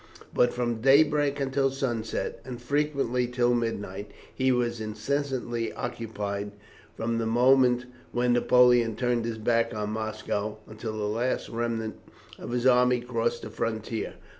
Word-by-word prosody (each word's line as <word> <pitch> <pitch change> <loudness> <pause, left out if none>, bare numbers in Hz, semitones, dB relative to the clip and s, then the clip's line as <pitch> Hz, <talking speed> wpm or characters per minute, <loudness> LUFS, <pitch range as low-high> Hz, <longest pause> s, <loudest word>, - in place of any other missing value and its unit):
But 120 - +3
from 120 -2 -2
daybreak 145 +1 +4
until 135 0 +1
sunset, 120 -5 -3
and 125 -1 -7
frequently 135 -2 0
till 120 0 +2
midnight, 105 -4 -3 0.2
he 130 0 +2
was 120 -2 0
incessantly 120 +1 -2
occupied, 105 -4 -4 0.4
from 115 0 -1
the 115 - -1
moment 125 +1 +4 0.3
when 120 0 +2
Napoleon 120 -2 +4
turned 120 -2 0
his 115 -1 -3
back 115 +1 +1
on 105 0 -2
Moscow, 110 -1 -3
until 110 0 -6
the 105 - -2
last 115 +5 -1
remnant 115 -1 -3 0.4
of - - -7
his 120 +1 -1
army 125 -1 +5
crossed 120 -1 -2
the 110 - -7
frontier. 110 0 -3
120 Hz, 140 wpm, -27 LUFS, 110-125 Hz, 0.4 s, army